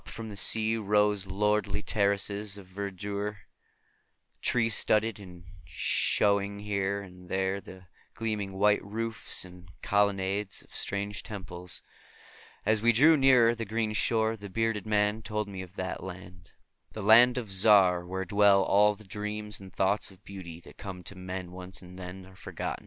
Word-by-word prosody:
djvu/101"> 115 Hz, -, -8 dB
&#8203;the 105 Hz, -, -8 dB
sea 110 Hz, +2 st, +3 dB
rose 105 Hz, -1 st, +1 dB
lordly 105 Hz, +1 st, 0 dB
terraces 100 Hz, 0 st, -1 dB
of 100 Hz, -, -11 dB
verdure, 100 Hz, +2 st, -4 dB, 1.0 s
tree 115 Hz, -2 st, +2 dB
studded, 110 Hz, -1 st, +2 dB
and 90 Hz, -3 st, -12 dB, 0.2 s
shewing 100 Hz, 0 st, +1 dB
here 100 Hz, -1 st, -1 dB
and 90 Hz, -1 st, -14 dB
there 95 Hz, +1 st, -1 dB
the 95 Hz, -2 st, -13 dB, 0.3 s
gleaming 105 Hz, -3 st, -3 dB
white 105 Hz, +2 st, +3 dB
roofs 110 Hz, 0 st, -3 dB
and 90 Hz, 0 st, -14 dB
colonnades 100 Hz, 0 st, 0 dB
of -, -, -21 dB
strange 100 Hz, 0 st, -2 dB
temples. 90 Hz, -3 st, -6 dB, 0.8 s
As 110 Hz, 0 st, +2 dB
we 120 Hz, +1 st, +5 dB
drew 150 Hz, +8 st, +6 dB
nearer 130 Hz, -5 st, +5 dB
the 115 Hz, -1 st, -4 dB
green 110 Hz, 0 st, -2 dB
shore 110 Hz, +1 st, +1 dB
the 100 Hz, -2 st, -9 dB
bearded 115 Hz, 0 st, -1 dB
man 105 Hz, 0 st, +1 dB
told 105 Hz, 0 st, -3 dB
me 95 Hz, -2 st, -6 dB
of 95 Hz, 0 st, -11 dB
that 95 Hz, -1 st, -4 dB
land, 90 Hz, -1 st, -10 dB, 0.4 s
the 110 Hz, -, -6 dB
Land 120 Hz, +4 st, +7 dB
of 115 Hz, -5 st, -4 dB
Zar, 95 Hz, -3 st, +6 dB
where 95 Hz, +2 st, -4 dB
dwell 100 Hz, 0 st, +5 dB
all 105 Hz, +2 st, +4 dB
the 110 Hz, -, -15 dB
dreams 105 Hz, 0 st, -5 dB
and 95 Hz, -1 st, -12 dB
thoughts 95 Hz, +3 st, 0 dB
of 95 Hz, 0 st, -19 dB
beauty 90 Hz, -4 st, -9 dB
that -, -, -16 dB
come 95 Hz, -3 st, -7 dB
to 100 Hz, -, -6 dB
men 90 Hz, -1 st, -6 dB
once 90 Hz, +1 st, -7 dB
and 90 Hz, 0 st, -12 dB
then 90 Hz, +1 st, -8 dB
are 95 Hz, 0 st, -16 dB
forgotten. -, -, -5 dB
100 Hz, 160 wpm, -29 LUFS, 95-105 Hz, 1.0 s, Land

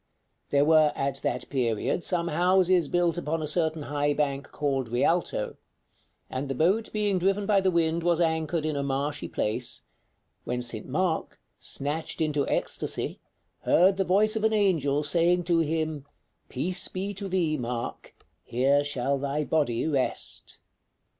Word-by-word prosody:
There 140 Hz, 0 st, +3 dB
were 155 Hz, -1 st, +5 dB
at 135 Hz, -1 st, -1 dB
that 125 Hz, -, -2 dB
period 125 Hz, +5 st, 0 dB
some 175 Hz, -2 st, 0 dB
houses 180 Hz, 0 st, +3 dB
built 175 Hz, 0 st, +1 dB
upon 160 Hz, -1 st, -2 dB
a -, -, -2 dB
certain 160 Hz, -1 st, 0 dB
high 145 Hz, 0 st, 0 dB
bank 140 Hz, -2 st, -1 dB
called 135 Hz, -4 st, -1 dB
Rialto, 150 Hz, +9 st, 0 dB, 0.7 s
and 130 Hz, +2 st, -4 dB
the 135 Hz, -, -3 dB
boat 195 Hz, -, +1 dB
being 205 Hz, -3 st, 0 dB
driven 195 Hz, +3 st, +1 dB
by 200 Hz, -1 st, +3 dB
the 190 Hz, -, +2 dB
wind 170 Hz, -1 st, +1 dB
was 170 Hz, 0 st, +2 dB
anchored 160 Hz, -1 st, 0 dB
in 155 Hz, -1 st, -1 dB
a 140 Hz, -, -1 dB
marshy 140 Hz, +2 st, -2 dB
place, 115 Hz, +3 st, -2 dB, 0.6 s
when 125 Hz, 0 st, -2 dB
St. 115 Hz, -3 st, -3 dB
Mark, 160 Hz, +4 st, -1 dB, 0.2 s
snatched 150 Hz, +5 st, -2 dB
into 150 Hz, -3 st, 0 dB
ecstasy, -, -, -2 dB, 0.4 s
heard 190 Hz, +3 st, +4 dB
the 195 Hz, -, +2 dB
voice 205 Hz, +4 st, +2 dB
of 220 Hz, -, -2 dB
an 220 Hz, 0 st, +3 dB
angel 160 Hz, -9 st, +2 dB
saying 170 Hz, +4 st, +2 dB
to 170 Hz, -1 st, +2 dB
him: 155 Hz, -2 st, -1 dB, 0.4 s
'Peace 180 Hz, +8 st, -1 dB
be 195 Hz, +2 st, -4 dB
to 200 Hz, 0 st, -6 dB
thee, 175 Hz, -4 st, +1 dB
Mark; 120 Hz, -3 st, -5 dB, 0.3 s
here 135 Hz, +4 st, +2 dB
shall 140 Hz, -1 st, -1 dB
thy 140 Hz, +2 st, -1 dB
body 140 Hz, -7 st, 0 dB
rest.'" 140 Hz, -5 st, -2 dB
155 Hz, 155 wpm, -27 LUFS, 140-175 Hz, 0.7 s, were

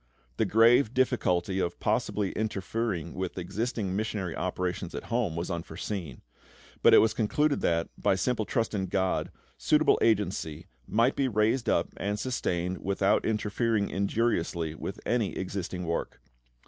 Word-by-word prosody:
The -, -, +2 dB
grave 115 Hz, +2 st, +4 dB
difficulty 95 Hz, -8 st, +1 dB
of 85 Hz, -2 st, -2 dB
possibly 105 Hz, -2 st, 0 dB
interfering 100 Hz, -4 st, -2 dB
with 95 Hz, 0 st, -4 dB
existing 100 Hz, +1 st, -2 dB
missionary 100 Hz, -4 st, -2 dB
operations 90 Hz, 0 st, -3 dB
at -, -, -6 dB
home 115 Hz, -9 st, 0 dB
was 85 Hz, +3 st, -3 dB
foreseen; 85 Hz, -, -6 dB, 0.6 s
but -, -, +7 dB
it -, -, +9 dB
was 110 Hz, -, +5 dB
concluded 145 Hz, +7 st, +1 dB
that, 85 Hz, 0 st, +1 dB
by -, -, +2 dB
simple 110 Hz, +2 st, 0 dB
trust 115 Hz, +2 st, -1 dB
in 95 Hz, -2 st, -1 dB
GOD, 95 Hz, 0 st, 0 dB, 0.3 s
suitable 60 Hz, -, +3 dB
agency 95 Hz, -8 st, 0 dB, 0.2 s
might 115 Hz, +5 st, +2 dB
be 135 Hz, -, +1 dB
raised 110 Hz, +2 st, +1 dB
up -, -, +2 dB
and 105 Hz, +1 st, -2 dB
sustained 90 Hz, -7 st, -2 dB
without 100 Hz, +1 st, +1 dB
interfering 110 Hz, 0 st, 0 dB
injuriously 95 Hz, -6 st, 0 dB
with 80 Hz, -, -6 dB
any 115 Hz, -6 st, 0 dB
existing 90 Hz, -1 st, -4 dB
work. 85 Hz, 0 st, -3 dB
100 Hz, 140 wpm, -28 LUFS, 90-115 Hz, 0.6 s, it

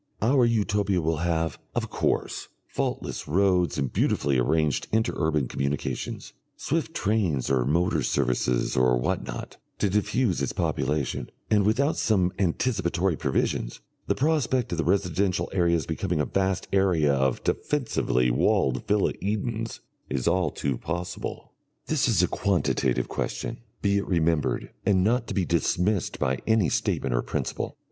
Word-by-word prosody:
Our 125 Hz, +3 st, +4 dB
Utopia 105 Hz, -4 st, +1 dB
will 80 Hz, -1 st, 0 dB
have, 80 Hz, 0 st, -1 dB, 0.2 s
of -, -, -2 dB
course, -, -, -1 dB, 0.2 s
faultless -, -, -3 dB
roads 90 Hz, +1 st, +2 dB
and 65 Hz, -3 st, -1 dB
beautifully 70 Hz, -3 st, +1 dB
arranged 75 Hz, +2 st, +1 dB
inter 110 Hz, +1 st, +1 dB
urban 75 Hz, -5 st, +1 dB
communications, 70 Hz, +3 st, -3 dB, 0.2 s
swift -, -, -2 dB
trains 95 Hz, -, 0 dB
or 65 Hz, -3 st, +2 dB
motor 85 Hz, +5 st, +2 dB
services 60 Hz, 0 st, 0 dB
or 65 Hz, -1 st, +4 dB
what -, -, -1 dB
not, -, -, -6 dB, 0.2 s
to 100 Hz, -, 0 dB
diffuse 105 Hz, -, +1 dB
its 70 Hz, -, -1 dB
population, 70 Hz, 0 st, -1 dB, 0.2 s
and 105 Hz, -2 st, +4 dB
without 140 Hz, +8 st, +2 dB
some 95 Hz, -4 st, +2 dB
anticipatory 95 Hz, -2 st, +1 dB
provisions, 65 Hz, -3 st, -1 dB, 0.3 s
the -, -, +1 dB
prospect 130 Hz, -5 st, +1 dB
of 85 Hz, -, -2 dB
the -, -, +2 dB
residential 95 Hz, 0 st, +1 dB
areas 85 Hz, -4 st, +2 dB
becoming 85 Hz, 0 st, -2 dB
a 75 Hz, -, +2 dB
vast 95 Hz, -1 st, -1 dB
area 90 Hz, -7 st, +3 dB
of 65 Hz, -2 st, 0 dB
defensively 65 Hz, -, 0 dB
walled 65 Hz, +1 st, +1 dB
villa 105 Hz, -1 st, +2 dB
Edens 110 Hz, +3 st, -2 dB, 0.3 s
is 65 Hz, -3 st, -1 dB
all 90 Hz, -4 st, +2 dB
too 70 Hz, -3 st, -2 dB
possible. 85 Hz, +2 st, -5 dB, 0.3 s
This -, -, +1 dB
is -, -, +3 dB
a -, -, +4 dB
quantitative 100 Hz, -4 st, 0 dB
question, 115 Hz, -, -4 dB, 0.2 s
be 100 Hz, -1 st, +3 dB
it 100 Hz, -, -5 dB
remembered, 85 Hz, -4 st, 0 dB
and 95 Hz, -2 st, +3 dB
not 115 Hz, +3 st, +1 dB
to -, -, -4 dB
be 95 Hz, -3 st, +1 dB
dismissed 90 Hz, +4 st, 0 dB
by 65 Hz, 0 st, 0 dB
any 110 Hz, -6 st, +3 dB
statement -, -, 0 dB
of -, -, -1 dB
principle. -, -, -3 dB
90 Hz, 145 wpm, -26 LUFS, 75-105 Hz, 0.3 s, Our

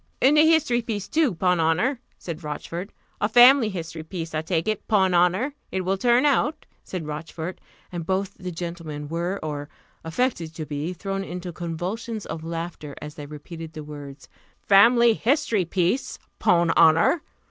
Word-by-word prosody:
"And 275 Hz, +3 st, +5 dB
a 305 Hz, -, +7 dB
history 295 Hz, -7 st, +3 dB
piece, 210 Hz, -4 st, -4 dB
too, 310 Hz, -, +1 dB
'pon 180 Hz, +1 st, +2 dB
honour!" 190 Hz, -, +1 dB, 0.2 s
said 170 Hz, -1 st, -7 dB
Rochfort: 170 Hz, +5 st, -5 dB, 0.3 s
"a 210 Hz, -, +2 dB
family 245 Hz, 0 st, +7 dB
history 165 Hz, -4 st, -6 dB
piece, 165 Hz, 0 st, -6 dB
I 155 Hz, -, 0 dB
take 165 Hz, +1 st, -1 dB
it, 215 Hz, -2 st, -2 dB
'pon 190 Hz, -4 st, +3 dB
honour! 180 Hz, +11 st, +2 dB, 0.2 s
it 190 Hz, -, -1 dB
will 185 Hz, +1 st, 0 dB
turn 245 Hz, +4 st, +4 dB
out," 295 Hz, +2 st, +1 dB, 0.2 s
said 180 Hz, -4 st, -5 dB
Rochfort; 160 Hz, +3 st, -6 dB, 0.3 s
and 175 Hz, -2 st, -4 dB
both 190 Hz, +3 st, -1 dB
the 185 Hz, -1 st, -7 dB
gentlemen 165 Hz, -4 st, -6 dB
were, 175 Hz, +4 st, -2 dB
or 145 Hz, -1 st, -4 dB, 0.3 s
affected 165 Hz, -3 st, -2 dB
to 155 Hz, -, -5 dB
be, 150 Hz, +3 st, -3 dB
thrown 195 Hz, +2 st, -4 dB
into 180 Hz, -1 st, -6 dB
convulsions 185 Hz, +7 st, -4 dB
of 160 Hz, -, -6 dB
laughter, 165 Hz, -3 st, -6 dB
as 150 Hz, 0 st, -8 dB
they 145 Hz, -1 st, -9 dB
repeated 160 Hz, +2 st, -9 dB
the 155 Hz, -, -7 dB
words, 145 Hz, -2 st, -10 dB, 0.4 s
"family 235 Hz, +4 st, +6 dB
history 225 Hz, -, +1 dB
piece, 185 Hz, +9 st, 0 dB, 0.2 s
'pon 170 Hz, -1 st, +3 dB
honour! 165 Hz, -, +5 dB
175 Hz, 165 wpm, -24 LUFS, 160-215 Hz, 0.4 s, a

